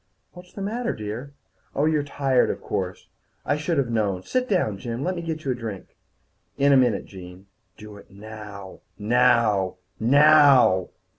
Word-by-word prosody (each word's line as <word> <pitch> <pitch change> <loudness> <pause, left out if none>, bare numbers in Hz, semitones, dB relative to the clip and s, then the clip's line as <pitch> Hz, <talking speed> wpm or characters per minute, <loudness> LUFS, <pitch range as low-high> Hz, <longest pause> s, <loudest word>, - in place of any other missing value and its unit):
"What's 180 0 -14
the 200 - -7
matter, 235 +3 -2
dear? 110 +7 -7 0.4
Oh, 145 - +1
you're 155 -1 +2
tired, 135 -3 +1
of - - -3
course. 95 -3 -5 0.4
I 145 - +1
should 150 +2 -2
have 130 -4 0
known. 100 -5 -1
Sit 255 - -2
down, 110 - 0
Jim. 120 +4 -5
Let 185 +3 -2
me 170 - -4
get 160 -2 -5
you 135 - 0
a - - +1
drink." 115 -6 -8 0.6
"In 140 0 +4
a - - +6
minute, 125 -3 +2
Jean." 90 0 -12 0.3
Do 105 -1 -12
it - - -16
now 100 -1 -11 0.2
now 110 -4 +2 0.2
NOW! 140 - +5
125 Hz, 165 wpm, -24 LUFS, 105-150 Hz, 0.6 s, a